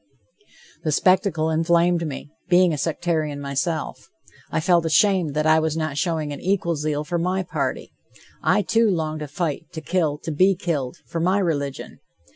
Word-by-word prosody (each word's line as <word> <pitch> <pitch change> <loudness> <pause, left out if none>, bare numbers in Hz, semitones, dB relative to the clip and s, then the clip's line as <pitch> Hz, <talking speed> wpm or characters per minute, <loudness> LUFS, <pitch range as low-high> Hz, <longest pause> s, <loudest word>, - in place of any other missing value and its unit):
The 155 - 0
spectacle 170 -1 +2
inflamed 170 +1 +2
me, 145 0 -7 0.2
being 180 -1 +5
a - - -2
sectarian 155 -1 -1
myself. 140 +3 -3 0.4
I - - -1
felt 170 +1 +3
ashamed 165 -1 +2
that 150 0 +1
I 155 0 +5
was 160 0 -1
not 155 -3 -2
showing 155 -2 -1
an 140 - -8
equal 180 -3 0
zeal 150 0 -2
for 170 +3 -2
my 185 +2 0
party. 180 - -3 0.5
I, - - +2
too, 225 -1 +3
longed 155 -4 -1
to 150 - -5
fight, 155 +1 -3
to 160 - -5
kill, 160 -2 0
to 165 - -3
be 185 +6 +3
killed, 150 -8 -3
for 165 - -4
my 185 +4 +2
religion. 145 -8 -2
160 Hz, 170 wpm, -23 LUFS, 150-175 Hz, 0.5 s, being